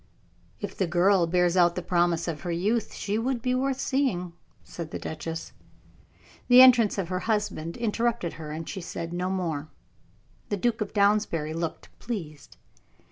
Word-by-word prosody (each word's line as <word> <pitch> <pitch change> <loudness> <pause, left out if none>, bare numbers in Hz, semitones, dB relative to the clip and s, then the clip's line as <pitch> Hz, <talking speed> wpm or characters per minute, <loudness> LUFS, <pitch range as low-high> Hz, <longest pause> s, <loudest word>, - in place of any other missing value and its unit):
"If - - -5
the 190 - 0
girl 175 +1 +3
bears 180 +1 +2
out 175 -2 +4
the 180 - -3
promise 175 -1 +1
of 160 -3 -4
her 175 - -3
youth, 210 +6 0
she 210 +2 -2
would 250 +1 -1
be 250 +2 -1
worth 265 +1 0
seeing," 235 -12 0 0.3
said 165 -2 -7
the - - -5
duchess. 165 +1 -6 0.9
The 245 0 +8
entrance 245 -5 +7
of 185 -4 -2
her 185 -1 -1
husband 210 -6 -1
interrupted 235 -4 -1
her, 155 - -7
and 160 +1 -6
she 195 - -5
said 170 0 -6
no 180 +1 -1
more. 165 -6 -2 0.8
The 205 - -1
Duke 230 +2 0
of 210 - -2
Downsbury 200 -7 +2
looked 165 0 -4
pleased. 165 - -7
180 Hz, 165 wpm, -27 LUFS, 170-220 Hz, 0.9 s, The